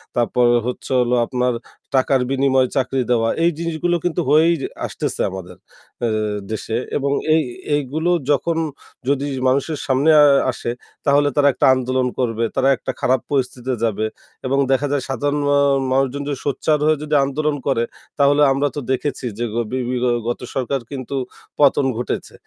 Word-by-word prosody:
তারপর 120 Hz, +1 st, +2 dB, 0.2 s
হচ্ছে 125 Hz, -, -5 dB
হলো 125 Hz, 0 st, +2 dB
আপনার 125 Hz, 0 st, 0 dB, 0.4 s
টাকার 130 Hz, 0 st, +3 dB
বিনিময়ে 135 Hz, -1 st, +2 dB
চাকরি 130 Hz, 0 st, 0 dB
দেওয়া। 115 Hz, -2 st, +2 dB
এই 170 Hz, -, +4 dB
জিনিসগুলো 170 Hz, +1 st, -1 dB
কিন্তু 175 Hz, 0 st, 0 dB
হয়েই 160 Hz, +3 st, +5 dB, 0.3 s
আসতেছে -, -, -3 dB
আমাদের 90 Hz, -2 st, -8 dB, 0.4 s
অ্যা 120 Hz, -, +1 dB, 0.4 s
দেশে। 110 Hz, +1 st, -3 dB, 0.2 s
এবং 140 Hz, -1 st, -1 dB, 0.2 s
এই 160 Hz, -, +4 dB, 0.3 s
এইগুলো 150 Hz, +4 st, -1 dB, 0.2 s
যখন 165 Hz, +4 st, +1 dB, 0.5 s
যদি 140 Hz, 0 st, +1 dB, 0.2 s
মানুষের 140 Hz, +4 st, +1 dB
সামনে 140 Hz, +3 st, +2 dB
আ -, -, +8 dB, 0.3 s
আসে 120 Hz, -1 st, -4 dB, 0.3 s
তাহলে 145 Hz, 0 st, +4 dB
তারা 145 Hz, -1 st, +4 dB
একটা -, -, +1 dB
আন্দোলন 130 Hz, 0 st, 0 dB
করবে, 115 Hz, -2 st, 0 dB
তারা 135 Hz, -, +2 dB
একটা -, -, -4 dB
খারাপ 130 Hz, -1 st, +2 dB
পরিস্থিতিতে 130 Hz, -1 st, -1 dB
যাবে 110 Hz, -1 st, 0 dB, 0.4 s
এবং 135 Hz, +2 st, +1 dB
দেখা 145 Hz, +2 st, +2 dB
যায় 145 Hz, -3 st, 0 dB
সাধারণ 145 Hz, +2 st, -1 dB
মা 145 Hz, -, +4 dB, 0.4 s
মানুষজন 135 Hz, +1 st, 0 dB
যদি 140 Hz, -3 st, -3 dB
সোচ্চার 150 Hz, +2 st, +1 dB
হয়ে 155 Hz, 0 st, +3 dB
যদি 150 Hz, 0 st, -1 dB
আন্দোলন 150 Hz, +2 st, -1 dB
করে, 130 Hz, -4 st, +2 dB, 0.4 s
তাহলে 145 Hz, +1 st, +4 dB
আমরা 140 Hz, +2 st, +1 dB
তো 145 Hz, -, -2 dB
দেখেছি 130 Hz, 0 st, -2 dB
যে 120 Hz, -, -1 dB
গ -, -, -5 dB, 0.2 s
বি 130 Hz, -, -1 dB
বি 125 Hz, -, -1 dB
গ -, -, +2 dB, 0.2 s
গত 120 Hz, -, -2 dB, 0.2 s
সরকার 135 Hz, +1 st, -1 dB
কিন্তু 135 Hz, 0 st, -5 dB, 0.4 s
পতন 140 Hz, -1 st, +4 dB
ঘটেছে। 120 Hz, -, -4 dB
135 Hz, 165 wpm, -20 LUFS, 125-145 Hz, 0.5 s, আ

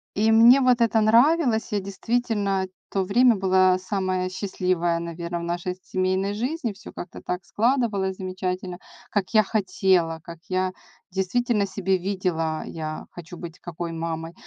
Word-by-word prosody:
и 220 Hz, +2 st, +3 dB
мне 235 Hz, +4 st, +7 dB
вот 250 Hz, -2 st, +3 dB
это 225 Hz, -1 st, +3 dB
нравилось. 235 Hz, +1 st, +3 dB
Я 205 Hz, -, +1 dB
действительно 200 Hz, -1 st, -1 dB, 0.2 s
то 195 Hz, -1 st, 0 dB
время 235 Hz, +4 st, +4 dB
была 185 Hz, -1 st, +3 dB
самая 185 Hz, -1 st, -2 dB
счастливая, 180 Hz, -3 st, -1 dB
наверное, 170 Hz, 0 st, -5 dB
в -, -, -6 dB
нашей 175 Hz, +1 st, -3 dB
семейной 185 Hz, +2 st, 0 dB
жизни. 245 Hz, +1 st, -2 dB
Всё 205 Hz, -, -12 dB
как-то 175 Hz, -, -9 dB
так 180 Hz, -1 st, -4 dB
складывалось 215 Hz, -5 st, 0 dB
замечательно, 185 Hz, -1 st, -4 dB, 0.3 s
как 205 Hz, -3 st, +1 dB
я 215 Hz, -, +7 dB
хотела, 185 Hz, -5 st, +1 dB
как 170 Hz, -1 st, -10 dB
я 185 Hz, 0 st, 0 dB, 0.4 s
действительно 205 Hz, +3 st, 0 dB
себе 190 Hz, -1 st, 0 dB
видела 175 Hz, -4 st, -1 dB
я 155 Hz, -1 st, -6 dB
хочу 175 Hz, 0 st, -10 dB
быть 170 Hz, 0 st, -9 dB
какой 170 Hz, 0 st, -6 dB
мамой. 165 Hz, 0 st, -4 dB
190 Hz, 145 wpm, -24 LUFS, 175-215 Hz, 0.4 s, мне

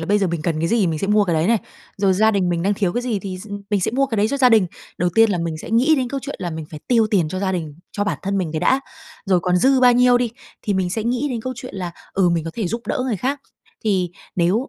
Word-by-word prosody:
là 165 Hz, -, -4 dB
bây 205 Hz, +2 st, +3 dB
giờ 195 Hz, -, +1 dB
mình 170 Hz, -3 st, -3 dB
cần 165 Hz, -2 st, -1 dB
cái 165 Hz, -, 0 dB
gì 235 Hz, -, +2 dB
thì 190 Hz, -, +3 dB
mình 160 Hz, -2 st, -1 dB
sẽ 195 Hz, -, -2 dB
mua 210 Hz, 0 st, +4 dB
cái 170 Hz, -3 st, 0 dB
đấy 160 Hz, +2 st, +1 dB
này, 230 Hz, +1 st, +3 dB, 0.4 s
rồi 195 Hz, -1 st, +3 dB
gia 220 Hz, +3 st, +4 dB
đình 195 Hz, -4 st, +1 dB
mình 170 Hz, -1 st, 0 dB
đang 200 Hz, +2 st, +1 dB
thiếu 190 Hz, -4 st, 0 dB
cái 245 Hz, -, -1 dB
gì 235 Hz, -5 st, -1 dB
thì 185 Hz, -1 st, -6 dB
s 205 Hz, +3 st, -11 dB, 0.2 s
mình 205 Hz, -2 st, +2 dB
sẽ -, -, 0 dB
mua 275 Hz, +4 st, +1 dB
cái 230 Hz, -5 st, -3 dB
đấy 210 Hz, +2 st, +2 dB
cho 280 Hz, -, -1 dB
gia 255 Hz, -2 st, +5 dB
đình. 220 Hz, -6 st, +5 dB, 0.3 s
Đầu 175 Hz, 0 st, +1 dB
tiên 225 Hz, 0 st, +5 dB
là 180 Hz, -, 0 dB
mình 165 Hz, -2 st, -3 dB
sẽ -, -, -8 dB
nghĩ 250 Hz, +8 st, +4 dB
đến 255 Hz, -3 st, -1 dB
câu 275 Hz, +2 st, -3 dB
chuyện 285 Hz, -, -5 dB
là 180 Hz, -2 st, -3 dB
mình 160 Hz, -1 st, -5 dB
phải 150 Hz, -2 st, -8 dB
tiêu 230 Hz, -3 st, +4 dB
tiền 175 Hz, -7 st, +2 dB
cho 185 Hz, -, -4 dB
gia 190 Hz, -1 st, 0 dB
đình, 160 Hz, -5 st, -4 dB, 0.2 s
cho 205 Hz, -, -1 dB
bản 205 Hz, -, -2 dB
thân 195 Hz, 0 st, -1 dB
mình 170 Hz, -5 st, -2 dB
cái 155 Hz, -, -2 dB
đã. 260 Hz, +9 st, +3 dB, 0.5 s
Rồi 185 Hz, -2 st, +3 dB
còn 180 Hz, +1 st, +1 dB
dư 260 Hz, +7 st, +4 dB
bao 250 Hz, -1 st, +7 dB
nhiêu 245 Hz, 0 st, +5 dB
đi, 245 Hz, -2 st, 0 dB, 0.3 s
thì 205 Hz, -, -1 dB
mình 185 Hz, -1 st, 0 dB
sẽ 220 Hz, +4 st, -2 dB
nghĩ 250 Hz, +4 st, 0 dB
đến 235 Hz, -, -2 dB
câu 255 Hz, +3 st, -4 dB
chuyện 250 Hz, -3 st, -8 dB
là, 180 Hz, -2 st, -4 dB, 0.2 s
ừ, 190 Hz, -2 st, +3 dB
mình 170 Hz, -2 st, 0 dB
có 165 Hz, -, -4 dB
thể 220 Hz, -6 st, -2 dB
giúp 230 Hz, +4 st, -4 dB
đỡ -, -, -1 dB
người 235 Hz, -6 st, -1 dB
khác. 270 Hz, +7 st, -2 dB, 0.4 s
Thì 185 Hz, -5 st, +1 dB, 0.3 s
nếu 190 Hz, +10 st, +1 dB
200 Hz, 325 wpm, -21 LUFS, 175-235 Hz, 0.5 s, bao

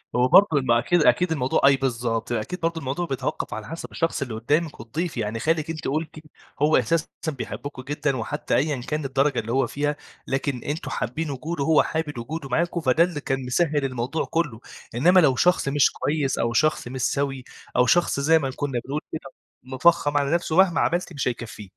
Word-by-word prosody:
هو 125 Hz, +1 st, +4 dB
برضه 200 Hz, +9 st, +7 dB
ال 130 Hz, -, 0 dB
ما 120 Hz, -1 st, +4 dB
أكيد 175 Hz, +4 st, +2 dB
أكيد 180 Hz, -2 st, +3 dB
الموضوع 130 Hz, -4 st, +1 dB
أي 140 Hz, 0 st, +7 dB
بالضبط. 120 Hz, -3 st, -2 dB
أكيد 120 Hz, +11 st, -3 dB
برضه 165 Hz, 0 st, -1 dB
الموضوع 140 Hz, +6 st, -3 dB
بيتوقَّف 135 Hz, -7 st, -3 dB
على 110 Hz, 0 st, -6 dB
حسب 165 Hz, -, -7 dB
الشخص 165 Hz, -3 st, -1 dB
اللي 125 Hz, -5 st, -3 dB
قُدّامِك 145 Hz, +8 st, -1 dB
والضيف. 150 Hz, +7 st, -4 dB
يعني 110 Hz, 0 st, -2 dB
خالِك 160 Hz, +2 st, 0 dB
أنتِ 155 Hz, -1 st, -4 dB
قُلتِ 155 Hz, +4 st, -2 dB, 0.5 s
هو 155 Hz, +1 st, +5 dB
أساسًا 155 Hz, +6 st, +1 dB, 0.2 s
بيحبكم 140 Hz, -1 st, -5 dB
جدًا 145 Hz, 0 st, -2 dB
وحتّى 145 Hz, +7 st, -2 dB
أيًا 140 Hz, -2 st, 0 dB
كان 150 Hz, +2 st, -3 dB
الدرجة 135 Hz, 0 st, +1 dB
اللي 115 Hz, +2 st, -4 dB
هو 130 Hz, -1 st, +2 dB
فيها، 145 Hz, +1 st, -1 dB, 0.3 s
لكن 135 Hz, -1 st, -2 dB
أنتم 150 Hz, +4 st, -4 dB
حابّين 150 Hz, +5 st, -3 dB
وجوده 145 Hz, +2 st, -3 dB
هو 160 Hz, +1 st, +4 dB
حابب 155 Hz, -4 st, -3 dB
وجوده 140 Hz, +4 st, -5 dB
معاكم 170 Hz, +5 st, 0 dB
فده 150 Hz, +4 st, +4 dB
اللي 170 Hz, -5 st, -3 dB
كان 135 Hz, -1 st, -2 dB
مسهِّل 145 Hz, +1 st, +1 dB
الموضوع 130 Hz, +4 st, -2 dB
كُلّه. 150 Hz, -9 st, -2 dB, 0.4 s
إنّما 180 Hz, +9 st, +5 dB
لو 135 Hz, -6 st, +4 dB
شخص 180 Hz, 0 st, +2 dB
مش 145 Hz, 0 st, +3 dB
كويس 145 Hz, -3 st, -1 dB
أو 115 Hz, 0 st, 0 dB
شخص 155 Hz, -1 st, +1 dB
مش 130 Hz, 0 st, -5 dB
سَوي 135 Hz, -2 st, -1 dB, 0.3 s
أو 125 Hz, 0 st, +5 dB
شخص 175 Hz, +1 st, +2 dB
زي 160 Hz, +3 st, +4 dB
ما 135 Hz, -2 st, -2 dB
كُنّا 135 Hz, -4 st, -2 dB
بنقول 145 Hz, +3 st, -3 dB
كده 135 Hz, -4 st, -7 dB, 0.3 s
مِفخّم 145 Hz, +3 st, +2 dB
على 140 Hz, +2 st, +1 dB
نفسه 170 Hz, -2 st, 0 dB
مهما 190 Hz, -3 st, +5 dB
عملتِ 175 Hz, 0 st, 0 dB
مش 140 Hz, -3 st, -2 dB
هيكفّيه. 115 Hz, -5 st, -5 dB
140 Hz, 195 wpm, -24 LUFS, 125-160 Hz, 0.5 s, برضه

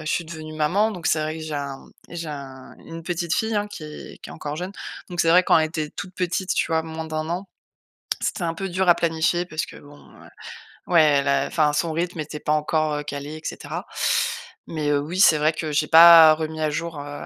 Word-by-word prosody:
je -, -, -1 dB
suis 170 Hz, -, -1 dB
devenu 155 Hz, -1 st, -9 dB
maman, 180 Hz, +8 st, +1 dB
donc 175 Hz, -4 st, -6 dB
c'est 155 Hz, -, +2 dB
vrai 155 Hz, +1 st, -3 dB
que 160 Hz, -, -7 dB
j'ai 155 Hz, -1 st, -5 dB
un 140 Hz, -2 st, -5 dB, 0.3 s
j'ai 170 Hz, -2 st, -6 dB
un 135 Hz, -3 st, -9 dB
une 165 Hz, 0 st, -8 dB
petite 170 Hz, -1 st, -2 dB
fille, 220 Hz, 0 st, -1 dB
hein, 205 Hz, 0 st, -1 dB
qui 155 Hz, -6 st, -10 dB
qui -, -, -9 dB
est -, -, -8 dB
encore 150 Hz, 0 st, -6 dB
jeune. 180 Hz, +3 st, -5 dB, 0.4 s
Donc 175 Hz, -1 st, -1 dB
c'est 165 Hz, -, +3 dB
vrai 180 Hz, +2 st, +6 dB
quand 165 Hz, -, +4 dB
elle 155 Hz, -, +2 dB
était 155 Hz, -2 st, -4 dB
toute 185 Hz, 0 st, -8 dB
petite, 180 Hz, +1 st, -1 dB
tu -, -, +1 dB
vois? 160 Hz, 0 st, +2 dB
Moins 160 Hz, 0 st, -6 dB
d'1 155 Hz, 0 st, -4 dB
an, 185 Hz, +3 st, -4 dB, 0.7 s
c'était 180 Hz, -, -2 dB
un 165 Hz, -1 st, -2 dB
peu 195 Hz, +2 st, -4 dB
dur 185 Hz, 0 st, +1 dB
à 175 Hz, -, +7 dB
planifier 170 Hz, +1 st, 0 dB
parce 155 Hz, -2 st, -3 dB
que -, -, -13 dB
bon, 145 Hz, 0 st, -15 dB, 0.2 s
heu, -, -, -14 dB, 0.6 s
ouais 170 Hz, -2 st, +5 dB
elle 140 Hz, -2 st, +3 dB
a 140 Hz, -, +2 dB
enfin, 150 Hz, -2 st, +1 dB
son 165 Hz, +2 st, 0 dB
rythme 170 Hz, +1 st, -3 dB
était 150 Hz, 0 st, -5 dB
pas 150 Hz, -, 0 dB
encore, 155 Hz, 0 st, 0 dB
heu, -, -, -5 dB
calé, 145 Hz, +1 st, -6 dB
et 155 Hz, -, -10 dB
cetera. -, -, -6 dB, 0.8 s
Mais, 155 Hz, -3 st, -2 dB
heu, 145 Hz, -, +2 dB
oui, 165 Hz, +6 st, -4 dB
c'est 155 Hz, -5 st, +6 dB
vrai 155 Hz, +2 st, +2 dB
que 155 Hz, -1 st, -4 dB
j'ai 150 Hz, +1 st, +1 dB
pas 165 Hz, -1 st, +9 dB
remis 155 Hz, 0 st, -5 dB
à 155 Hz, -, +1 dB
jour, 165 Hz, 0 st, -4 dB
heu, 145 Hz, 0 st, -7 dB
160 Hz, 240 wpm, -23 LUFS, 150-170 Hz, 0.8 s, pas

